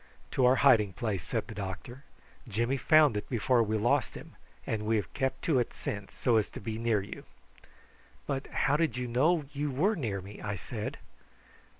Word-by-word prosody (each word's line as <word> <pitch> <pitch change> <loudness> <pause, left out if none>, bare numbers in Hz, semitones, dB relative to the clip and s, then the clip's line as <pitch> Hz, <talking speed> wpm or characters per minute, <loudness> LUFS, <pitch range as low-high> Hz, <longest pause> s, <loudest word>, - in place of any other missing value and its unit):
"To 125 - +3
our 130 - +5
hiding 110 -8 +5
place," 100 -1 -2
said 110 +5 -2
the 115 - -8
doctor. 105 +7 -7 0.4
"Jimmy 120 +4 0
found 150 -2 +5
it 105 - -4
before 120 0 +2
we 110 -1 0
lost 110 +3 +1
him, - - -10 0.3
and 105 -1 -2
we 115 - +3
have 105 - -2
kept 135 -3 -2
to 150 -6 +3
it 120 - -2
since, 100 -1 -5
so 120 -3 +2
as 110 - +1
to - - -8
be 110 +2 -4
near 115 -4 +1
you." 100 - -9 1.0
"But 135 -1 -3
how 145 +2 +1
did 155 -6 0
you 125 -1 -2
know 150 +7 +2
you 145 +1 -1
were 175 +12 +1
near 110 - -2
me?" 100 +2 -10
I 100 -1 -3
said. 85 - -5
120 Hz, 195 wpm, -30 LUFS, 105-135 Hz, 1.0 s, our